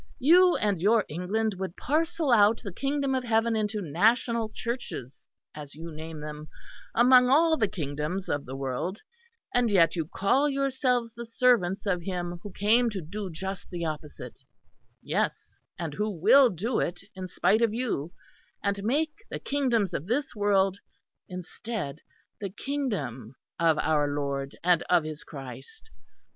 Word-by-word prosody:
"You 350 +6 +6
and 200 -5 0
your 215 +2 +4
England 200 +7 -1
would 190 -1 -5
parcel 315 0 0
out 215 0 +5
the 200 - -5
Kingdom 275 +3 -1
of 260 -1 0
heaven 225 -1 +2
into 210 -1 -1
national 225 - +2
Churches, 230 - -6 0.2
as 145 -2 -9
you 165 +2 -8
name 160 0 -8
them 150 0 -7 0.5
among 250 +1 +6
all 320 +4 +5
the 220 -8 +1
kingdoms 155 +2 -4
of 145 -1 -1
the 130 - -6
world; 135 - -3 0.5
and 245 -2 +3
yet 185 -5 +4
you 165 -3 -2
call 260 - +2
yourselves 260 -4 0
the 235 0 -8
servants 230 -7 +2
of 180 -3 0
Him 175 -1 -4
who 205 - -8
came 225 +6 +3
to 205 -3 -4
do 190 +4 -6
just 190 +3 -6
the 170 -2 -4
opposite 150 -1 -6 0.6
yes, - - -2 0.2
and 165 -4 -4
who 210 +6 -1
will 215 - +6
do 220 +6 -1
it, 175 +1 -2
in 185 -1 -6
spite 215 +4 +2
of 230 -2 +3
you, 215 - -2 0.5
and 200 0 -1
make 300 +7 +1 0.2
the - - -4
kingdoms 240 -9 0
of 160 - -4
this 270 +6 -1
world, 200 -2 +2 0.5
instead, 180 -3 -5 0.4
the 200 - -4
Kingdom 185 - -4 0.2
of 165 -2 +3
our 150 -1 +2
Lord 140 -1 -3
and 175 -1 +4
of 175 -3 +4
His 155 -1 -6
Christ. 135 -3 -10
200 Hz, 155 wpm, -27 LUFS, 165-235 Hz, 0.6 s, You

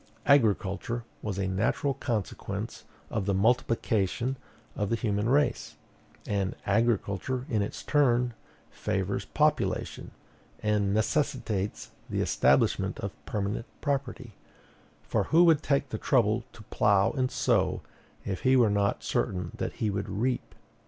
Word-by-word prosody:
"Agriculture 115 -3 +2 0.2
was 105 -3 -3
a 95 -1 0
natural 95 +9 0
consequence 120 -7 -4 0.3
of 105 -3 -2
the 100 - +2
multiplication 115 +2 +1 0.4
of 105 -2 -1
the 115 - +2
human 105 -1 0
race, 145 +3 +1 0.5
and 100 -2 -1
agriculture, 115 +3 0
in 110 -3 +2
its 100 - -4
turn, 125 -4 +2 0.4
favors - - -2
population, - - 0 0.5
and 105 -2 +1
necessitates 110 -3 -1 0.2
the - - -2
establishment - - +2
of - - -3 0.2
permanent 105 +2 -2
property; 135 -4 -2 0.7
for - - 0
who 165 +2 +5
would 165 -4 +5
take 140 -2 +1
the - - -4
trouble 115 -2 +2
to 110 - -13
plough 100 -1 +3
and 130 -3 0
sow, - - +1 0.4
if 95 - -2
he 130 0 +4
were 120 -5 +5
not 100 0 +1
certain 90 +6 -1
that - - -3
he 110 -2 -1
would 100 +1 -3
reap?" 125 +4 -2
110 Hz, 130 wpm, -28 LUFS, 100-130 Hz, 0.7 s, who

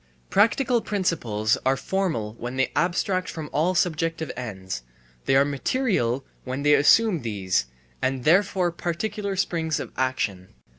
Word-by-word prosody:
Practical 230 +3 +3
principles 120 - 0
are 135 +1 +2
formal 155 - -2
when 120 +2 -5
they 130 0 +1
abstract 185 +1 0
from 155 -2 -6
all 170 +5 +1
subjective 165 -2 0
ends; 95 - -5 0.4
they 135 - +3
are 135 +1 +5
material 140 - 0 0.2
when 130 +2 -4
they 145 0 +5
assume 170 +5 +5
these, 95 - -1 0.3
and 130 -1 -1
therefore 180 +2 +3
particular 195 +4 -3
springs 165 -5 -1
of - - -6
action. 105 - -2
155 Hz, 135 wpm, -25 LUFS, 125-185 Hz, 0.4 s, are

